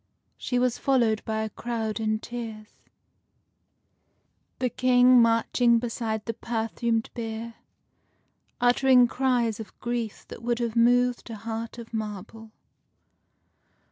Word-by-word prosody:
She 250 - -2
was 250 -1 +1
followed 235 -6 +2
by 220 0 -1
a 220 - -5
crowd 225 -2 -3
in 215 -1 0
tears, 220 -2 -8 1.8
the 255 - 0
King 250 -1 +5
marching 230 +1 +3
beside 225 -2 -3
the 230 - -2
perfumed 225 0 -2
bier, 230 0 -5 1.1
uttering 250 0 +5
cries 240 -4 0
of 220 - -10
grief 235 -3 -4
that - - -9
would 240 0 -1
have 235 -1 -2
moved 245 +1 +3
a 225 - -5
heart 225 +2 -6
of 230 -1 -10
marble. 220 +1 -6
230 Hz, 115 wpm, -26 LUFS, 220-245 Hz, 1.8 s, King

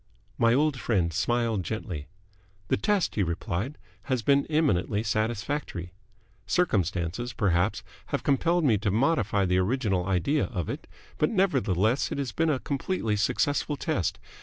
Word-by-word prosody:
My 115 0 +4
old 145 -1 +2
friend 90 -10 0
smiled 115 +1 +1
gently. 90 -6 -5 0.6
"The - - +4
test," 200 - +1
he 105 - 0
replied, 90 - -2 0.3
"has 130 -4 -1
been 140 +4 +3
eminently 120 - +1
satisfactory. 110 -3 -2 0.5
Circumstances, 100 - 0
perhaps, 100 +1 +1 0.2
have 145 - -2
compelled 165 +5 +2
me 115 -8 +3
to 105 - 0
modify 110 -3 +2
the 90 0 +2
original 95 -3 0
idea 95 - +1
of 90 - -4
it, - - -5 0.3
but 150 - +3
nevertheless 130 - +1
it - - -2
has 140 -3 -2
been 165 0 +1
a 145 - +2
completely 135 - -1
successful 145 +8 0
test. 145 - -1
115 Hz, 140 wpm, -27 LUFS, 95-145 Hz, 0.6 s, My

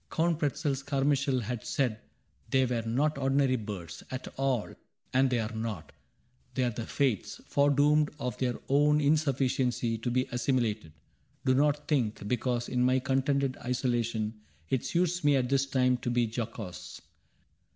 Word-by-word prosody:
Count 165 -1 +1
Pretzel's 145 -2 -1
Carmi 140 +1 +1
chael 135 -3 0
Had 115 0 -4
said 125 -7 -1 0.5
they 130 -1 +3
were 120 -2 -1
not 135 +6 0
ordinary 135 -1 +2
Birds 95 -7 -6
At 130 0 -5
all, 135 -5 -1 0.2
— - - -40
and 130 +1 +4
they 125 -2 +1
are 110 +1 -3
not: 110 -6 -4 0.6
they 130 - +1
are 120 - +1
the 115 +1 -6
Fates, 130 -8 -1
Foredoomed 145 +1 +3
of 125 - -3
their 125 -2 0
own 150 +2 +4
insufficiency 135 -5 +1
To 120 - -2
be 130 +1 +1
assimilated. 115 - -1 0.3
— - - -38
Do 130 - +4
not 145 +2 +2
think. 115 -8 0
Because 120 0 -1
in 125 - 0
my 130 +1 +4
contented 135 0 0
isolation 115 -3 -1 0.3
It 130 - +1
suits 180 0 0
me 145 -1 +5
at 125 -2 +1
this 135 0 +2
time 125 -2 +2
to 120 - -4
be 120 0 +2
jocose. 110 -4 -6
130 Hz, 160 wpm, -29 LUFS, 120-140 Hz, 0.6 s, me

